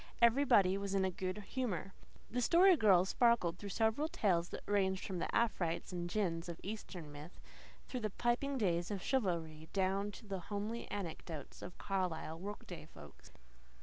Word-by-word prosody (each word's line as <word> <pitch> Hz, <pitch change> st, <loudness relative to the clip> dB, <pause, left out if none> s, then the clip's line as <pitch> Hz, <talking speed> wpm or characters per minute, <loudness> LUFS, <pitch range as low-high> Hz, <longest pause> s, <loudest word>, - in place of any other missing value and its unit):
Everybody 230 Hz, -6 st, +5 dB
was 200 Hz, 0 st, -2 dB
in 190 Hz, -1 st, +3 dB
good 185 Hz, +2 st, -3 dB
humour. 195 Hz, -6 st, -3 dB, 0.4 s
The 245 Hz, +2 st, 0 dB
Story 355 Hz, +8 st, +6 dB
Girl 195 Hz, -, +5 dB
sparkled 195 Hz, -6 st, +3 dB
through 205 Hz, -, -6 dB
several 220 Hz, +9 st, +1 dB
tales 190 Hz, -, +1 dB
that -, -, -7 dB
ranged 190 Hz, -2 st, +1 dB
from 185 Hz, -3 st, -3 dB
the -, -, -2 dB
afrites 190 Hz, -9 st, 0 dB
and 175 Hz, -1 st, -3 dB
jinns 175 Hz, -4 st, -1 dB
of 170 Hz, -, -6 dB
Eastern 185 Hz, -7 st, -6 dB
myth, 150 Hz, +4 st, -10 dB, 0.5 s
through 255 Hz, -, -3 dB
the 215 Hz, -2 st, -1 dB
piping 240 Hz, +6 st, 0 dB
days 175 Hz, -6 st, +1 dB
of 200 Hz, -3 st, -3 dB
chivalry, 165 Hz, -, -1 dB
down 195 Hz, +1 st, +1 dB
to 220 Hz, -, -11 dB
the 195 Hz, -2 st, -3 dB
homely 210 Hz, +3 st, -3 dB
anecdotes 165 Hz, -5 st, -6 dB
of 180 Hz, -, -8 dB
Carlisle 175 Hz, -4 st, -2 dB
workaday 190 Hz, -4 st, -7 dB
folks. 75 Hz, -, -14 dB
195 Hz, 160 wpm, -36 LUFS, 175-220 Hz, 0.5 s, Story